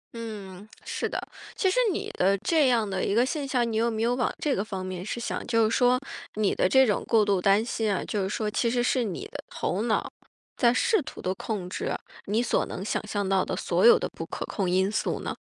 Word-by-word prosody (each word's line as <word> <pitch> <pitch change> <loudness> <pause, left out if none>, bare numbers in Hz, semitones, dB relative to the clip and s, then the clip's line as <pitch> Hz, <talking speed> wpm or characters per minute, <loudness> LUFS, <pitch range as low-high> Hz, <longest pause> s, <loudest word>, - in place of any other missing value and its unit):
嗯， 210 -4 -7 0.2
是 - - -2
的。 - - -2 0.4
其 380 -2 +2
实 - - +1
你 - - -3
的 195 +2 +2
这 305 - +2
样 230 -4 +2
的 190 -1 -2
一 200 - 0
个 240 - +4
现 280 +1 -3
象， 245 -3 +1
你 220 - -1
有 230 +1 +2
没 225 0 -2
有 240 - +2
往 245 0 0
这 290 -3 +1
个 195 - -1
方 195 -3 -5
面 185 -1 -5
去 225 - -4
想， 235 - -3
就 230 -2 +3
是 225 - 0
说， 250 0 +4 0.4
你 210 -2 +1
的 - - +2
这 265 +3 +6
种 210 -4 0
过 220 -3 +4
度 200 -3 +1
担 200 +4 +4
心 220 -3 -1
啊， 195 - -1
就 205 - -2
是 190 - -1
说 210 +1 -1
其 235 +2 +1
实 245 0 +1
是 250 -1 +2
你 195 -6 -4
的 - - -7
头 190 +4 -2
脑， 230 -2 0 0.4
在 235 -2 +4
试 425 - +2
图 - - -9
地 185 - -1
控 195 -2 -4
制， 180 - -3 0.3
你 220 +4 +1
所 240 - +1
能 190 - -6
想 215 - -2
象 205 -2 -2
到 190 -1 +2
的 - - -3
所 - - 0
有 470 - +8
的 - - -2
不 - - -7
可 - - -5
控 195 -5 -2
因 190 +2 +2
素 215 - -1
呢？ - - -4
220 Hz, 265 characters per minute, -27 LUFS, 195-245 Hz, 0.4 s, 有